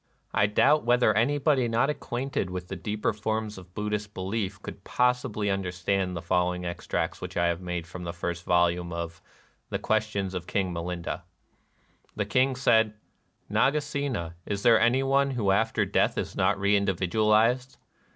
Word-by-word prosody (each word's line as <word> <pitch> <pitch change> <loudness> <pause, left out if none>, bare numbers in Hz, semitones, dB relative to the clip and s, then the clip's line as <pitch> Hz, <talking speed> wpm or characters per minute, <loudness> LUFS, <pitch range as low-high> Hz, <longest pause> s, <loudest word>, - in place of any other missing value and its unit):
I 100 - +3
doubt 150 +8 +4
whether 120 -2 +4
any 120 +8 +2
body 140 -3 +2
not 115 +5 +2
acquainted 125 -7 -3
with 90 0 -6
the 95 - -4
deeper 105 +4 -2
forms 110 -1 -3
of 90 0 -16
Buddhist 105 0 -3
belief 95 0 -3
could 100 - -8
possibly 125 -5 +1
understand 90 0 -1
the - - -6
following 90 0 0
extracts 85 0 -3
which - - -6
I 85 - +3
have 85 +1 -2
made 90 -2 -4
from 90 +1 -8
the 85 - -3
first 85 0 -4
volume 85 0 +2
of 85 0 -5 0.5
"The - - -1
Questions 105 -3 -1
of 90 -2 -5
King 95 -3 -1
Milinda: 85 +1 -4 0.3
" - - -41
— - - -36
The - - -1
King 130 +1 +2
said: 110 -4 +3 0.5
"Nagasena, 140 - 0
is 100 -1 -3
there 115 -2 +6
any 125 +3 +3
one 140 +1 +3
who 115 -7 +1
after 110 +3 +2
death - - +1
is - - -3
not 95 +2 +2
reindividualized 105 +5 +2
105 Hz, 165 wpm, -27 LUFS, 90-120 Hz, 0.5 s, there